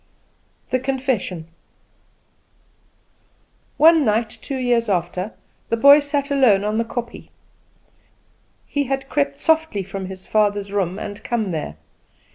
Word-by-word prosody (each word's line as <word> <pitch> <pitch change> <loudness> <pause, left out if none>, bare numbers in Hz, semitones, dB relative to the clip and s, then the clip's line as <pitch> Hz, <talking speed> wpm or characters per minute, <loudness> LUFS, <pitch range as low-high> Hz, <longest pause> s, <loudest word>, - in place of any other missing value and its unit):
The 255 - +2
Confession. 255 -10 -2 2.3
One 320 +1 +6
night, 220 -1 +1
two 275 - -4
years 240 -3 +1
after, 180 +2 -2 0.4
the 230 - +1
boy 280 +5 +8
sat 285 0 -2
alone 245 -8 +4
on 210 +1 -1
the - - +2
kopje. 235 0 -6 1.4
He 285 -1 -1
had 270 +1 -3
crept 280 -1 0
softly 320 -12 +1
from 195 0 -6
his 190 0 -10
father's 205 -2 +1
room 190 -2 -1
and 205 0 -7
come 225 -5 -1
there. 150 - -4
230 Hz, 120 wpm, -21 LUFS, 200-275 Hz, 2.3 s, boy